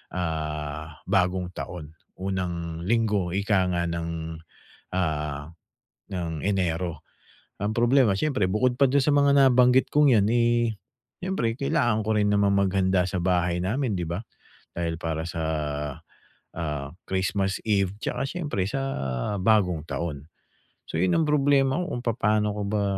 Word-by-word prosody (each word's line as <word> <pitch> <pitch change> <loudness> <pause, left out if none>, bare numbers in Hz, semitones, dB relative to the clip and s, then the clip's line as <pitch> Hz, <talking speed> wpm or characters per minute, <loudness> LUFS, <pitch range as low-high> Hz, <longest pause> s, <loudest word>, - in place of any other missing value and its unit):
ah, 75 -2 -4
bagong 90 -1 +1
taon, 80 -4 -6 0.3
unang 85 -3 -3
linggo 105 -4 +1
ika 100 -1 +2
nga 85 - 0
ng, 85 -1 -4 0.6
ah, 75 -4 -2 0.6
ng 85 -4 -4
Enero. 90 -4 -1 0.6
Ang 105 +1 0
problema 120 -2 +4
siyempre 130 -9 +1
bukod 125 +4 +2
pa 140 - +6
do'n 140 +1 +3
sa 150 - +2
mga 140 0 +4
nabanggit 130 -1 +5
kong 145 -5 +5
'yan, 100 -1 +4
eh, 120 -1 +2 0.5
siyempre 180 -12 -1
kailangan 135 -7 +1
ko 110 - +2
rin 105 0 +2
namang 100 -1 +3
maghanda 95 -1 +2
sa 95 0 -2
bahay 90 -1 +1
namin, 120 +4 0
'di 85 - -2
ba. 85 +4 -3 0.6
Dahil 85 -1 -1
para 80 -1 -2
sa, 85 -1 -4 1.2
ah, 75 -4 -3 0.2
Christmas 95 +1 0
Eve 100 -3 +1
'tsaka 135 - -2
siyempre 145 - -2
sa 135 +7 -2 0.6
Bagong 90 -6 +2
Taon. 75 -4 -4 0.6
So - - -3
'yon 90 -1 +2
ang 165 - +2
problema 140 0 +3
ko 180 - -4
kung 120 - -7
papano 105 -2 +1
ko 105 - -3
ba, 105 0 0
95 Hz, 140 wpm, -26 LUFS, 85-120 Hz, 1.2 s, pa